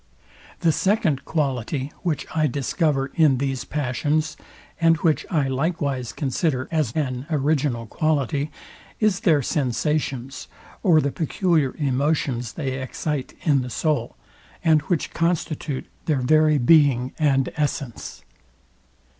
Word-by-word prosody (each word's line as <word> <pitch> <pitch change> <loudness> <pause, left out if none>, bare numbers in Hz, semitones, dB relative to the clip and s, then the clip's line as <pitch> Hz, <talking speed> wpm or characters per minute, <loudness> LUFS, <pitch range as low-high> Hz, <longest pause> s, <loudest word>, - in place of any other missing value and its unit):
The 165 - +4
SECOND 190 - +1
quality, 140 -2 -2
which 165 -5 -1
I 155 -1 +2
discover 140 +1 0
in 150 -5 +4
these 135 -1 -2
passions, 150 +2 -1 0.4
and 165 -1 +4
which 160 -2 +1
I 150 -6 +1
likewise 140 -3 -1
consider 135 -1 -1
an 155 -2 +2
an 130 -4 -2
original 140 -5 0
quality, 145 +3 0 0.5
is 215 -4 +2
their 155 -6 +3
sensations, 135 0 -1 0.3
or 170 -6 +5
the 140 - -1
peculiar 160 -3 0
emotions 135 -4 0
they 135 -4 -3
excite 135 +1 -4
in 145 -5 +3
the 125 - -5
soul, 135 0 -1 0.5
and 155 -2 +4
which 175 -4 -1
constitute 160 -4 -1 0.2
their 145 -5 +1
very 155 +3 +4
being 135 -2 +4
and 135 -3 +2
essence. 140 -6 -3
145 Hz, 120 wpm, -23 LUFS, 130-160 Hz, 0.5 s, or